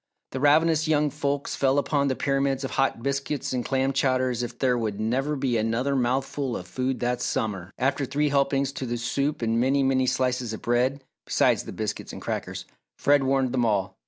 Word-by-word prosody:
The 130 - -4
ravenous 155 +3 +4
young 150 -1 +2
folks 145 -1 -2
fell 135 0 +2
upon 140 0 +1
the 130 - 0
pyramids 135 0 0
of 135 - -3
hot 135 -4 0
biscuits 140 0 -2
and 125 -1 -1
clam 135 +1 0
chowder 130 -1 +1
as 120 -1 -2
if 120 0 -5
there 125 -1 +2
would 110 -4 -2
never 130 +7 0
be 130 -4 0
another 115 +5 0
mouthful 130 +1 -1
of - - -8
food 130 0 -2
that 125 0 0
summer. 100 -8 -2
After 135 +2 0
three 145 +3 +1
helpings 140 -1 +1
to 135 -2 -5
the 120 0 -2
soup 140 +4 -1
and 115 0 +1
many, 135 +2 +2
many 130 -1 +2
slices 125 -3 0
of 110 - -7
bread, 125 +3 +1 0.2
besides - - +2
the - - -7
biscuits - - -4
and - - -7
crackers, - - -4 0.3
Fred 145 0 +4
warned 135 -1 +1
them 125 -1 +1
all. 100 -4 0
130 Hz, 200 wpm, -26 LUFS, 120-140 Hz, 0.3 s, ravenous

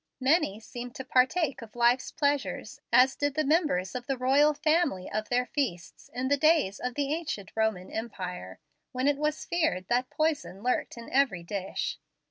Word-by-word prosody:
Many 260 - +2
seem 240 +2 -7
to 265 - -7
partake 260 +3 +2
of 225 -1 -12
life's 240 +1 +3
pleasures 285 -2 -1
as 260 +1 +5
did 290 -1 -1
the 310 - +2
members 290 - +1
of 245 -1 -5
the 270 - -1
royal 280 +4 +4
family 305 - +1
of 215 0 -3
their 250 0 +2
feasts, 200 - -4
in 255 +1 -2
the 285 +1 +3
days 305 - +3
of 250 -1 -4
the 285 0 0
ancient 305 - -4
Roman 220 -5 -1
empire, 180 - -5 0.4
when 255 +2 0
it 290 -1 +3
was 300 +1 -1
feared 310 - 0
that 250 +1 +1
poison 310 - -1
lurked 250 -1 -1
in 230 - -9
every 260 -11 +2
dish. 195 +1 -3
255 Hz, 175 wpm, -28 LUFS, 215-290 Hz, 0.4 s, as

